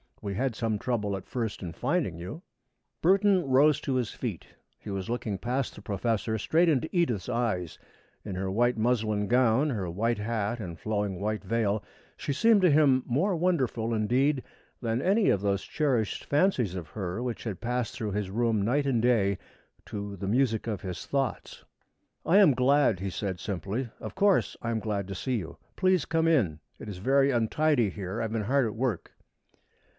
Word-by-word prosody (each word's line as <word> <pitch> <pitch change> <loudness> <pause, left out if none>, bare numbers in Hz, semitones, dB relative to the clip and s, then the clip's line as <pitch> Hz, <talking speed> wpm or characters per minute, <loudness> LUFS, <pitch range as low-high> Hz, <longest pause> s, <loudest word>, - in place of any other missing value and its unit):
We 100 - -4
had 130 +1 -1
some 110 -2 -1
trouble 105 -5 -1
at 95 - -8
first 115 -4 -3
in 85 -3 -5
finding 125 - -1
you." 90 - -7 0.6
Burton 190 -1 +4
rose 140 +3 +4
to 135 - -1
his 125 -4 0
feet. - - -5 0.3
He - - -9
was 95 0 -4
looking 115 -4 -2
past 125 +5 -2
the - - -11
professor, 110 +2 -1
straight 165 +10 +2
into 155 0 +1
Edith's 125 - +1
eyes. 110 -9 -1 0.5
In 100 -3 -5
her 95 +1 -2
white 120 +5 +2
muslin 110 -3 +1
gown, 125 +4 +3
her 100 -7 -2
white 115 +6 0
hat 110 +1 -2
and 85 -6 -7
flowing 105 -4 -2
white 105 +1 -2
veil, 110 -3 0 0.3
she 140 - -2
seemed 225 +5 +4
to 180 - +6
him 140 -4 +4
more 175 +11 +1
wonderful, 130 -10 0
indeed, 130 +6 +1 0.4
than 115 0 -1
any 200 +5 +3
of 100 - +2
those 100 -1 0
cherished 130 -9 -1
fancies 145 - +1
of 85 -5 -6
her 95 +2 -4
which 125 -2 -4
had 105 -6 -5
passed 125 0 -2
through 110 -4 -3
his 100 -1 -2
room 115 0 +1
night 135 +8 +1
and 125 -5 +1
day 105 -5 +2 0.5
to 100 -1 -5
the 95 - -4
music 115 0 +1
of 105 -4 -3
his 90 -2 -6
thoughts. 135 -1 -3 0.6
"I 180 - +4
am 195 -9 +7
glad," 130 -5 +3
he 95 +1 -3
said 95 -1 -3
simply. 100 - -3
"Of - - -7
course 200 0 +3
I 115 - -2
am 115 -1 0
glad 100 -3 -2
to 95 - -4
see 130 +7 -2
you! 85 -5 -6 0.2
Please 185 -4 +2
come 165 0 +1
in. 105 - +2 0.2
It - - -8
is 100 - -6
very 135 +7 +3
untidy 120 +1 +2
here. 95 +2 -5
I - - -1
have 110 - -3
been 110 -1 -1
hard 135 +4 +2
at 110 - -3
work." 115 -5 -2
115 Hz, 190 wpm, -28 LUFS, 100-135 Hz, 0.6 s, am